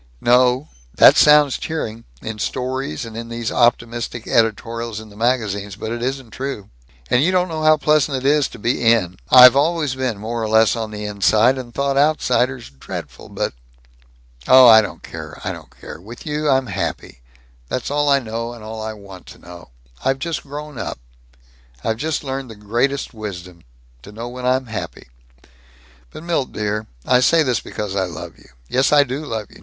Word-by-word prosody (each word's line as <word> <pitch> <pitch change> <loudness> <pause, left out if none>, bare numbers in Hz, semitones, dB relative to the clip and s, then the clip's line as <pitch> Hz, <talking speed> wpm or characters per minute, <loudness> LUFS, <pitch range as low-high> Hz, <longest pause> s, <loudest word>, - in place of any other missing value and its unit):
"No. 125 +3 +3 0.3
That - - +8
sounds 150 -2 +5
cheering, 115 -8 -5 0.2
in 110 -1 -6
stories 130 - -3
and 115 +1 -8
these 115 -1 -3
optimistic 120 -1 0
editorials 115 0 0
in 110 0 -11
the 100 - -16
magazines, 105 -4 -1
but 110 +2 -6
it 120 0 -4
isn't 130 -2 -4
true. 130 - -6 0.4
And 125 - +4
you 180 - +2
don't 180 -1 +2
know 160 -1 -4
how 155 0 +5
pleasant 150 -2 +2
it 130 - -6
is 145 0 +3
to - - -12
be 120 +3 -1
In. 110 -6 +2
I've 125 0 +9
always 150 -1 +1
been 130 -4 -2
more 115 +3 -4
or 110 - -2
less 110 +1 +4
on 110 -2 -4
the 105 0 -6
inside, 105 +4 +3
and 120 -2 -8
thought 140 +2 -1
outsiders 130 - +1
dreadful. 65 - -9
But - - -3 0.9
Oh, 130 -1 +8
I 110 -1 +9
don't 105 - -7
care! - - -9
I - - -2
don't - - -10
care! - - -10
With 115 +5 -11
you 150 0 -1
I'm 135 -1 +3
happy. - - -5 0.5
That's 125 - -3
all 145 0 +1
I 140 - +5
know 115 -1 -4
and 115 -2 -12
all 110 0 -7
I 110 0 -4
want 100 -3 -13
to - - -12
know. 85 -4 -13 0.3
I've 135 0 +1
just 165 +3 -3
grown 145 -1 -8
up. - - -4 0.9
I've 110 - -1
just 155 +5 -2
learned 135 -2 -5
the 110 - -10
greatest 120 +8 -1
wisdom 90 -5 -8 0.4
to 100 - -12
know 115 +3 -7
when 125 0 -5
I'm 130 +1 +1
happy. 110 - -7 1.0
But, 155 - -11
Milt 165 -6 -2
dear 105 0 -3 0.2
I 125 - +4
say 160 +6 +4
this 125 -5 0
because 105 -2 -6
I 95 -1 +1
love 85 -5 -9
you. - - -20 0.2
Yes, 130 - +1
I 145 -1 +6
do 135 +3 -5
love 110 -4 -4
you. - - -16
120 Hz, 190 wpm, -20 LUFS, 110-135 Hz, 1.0 s, I've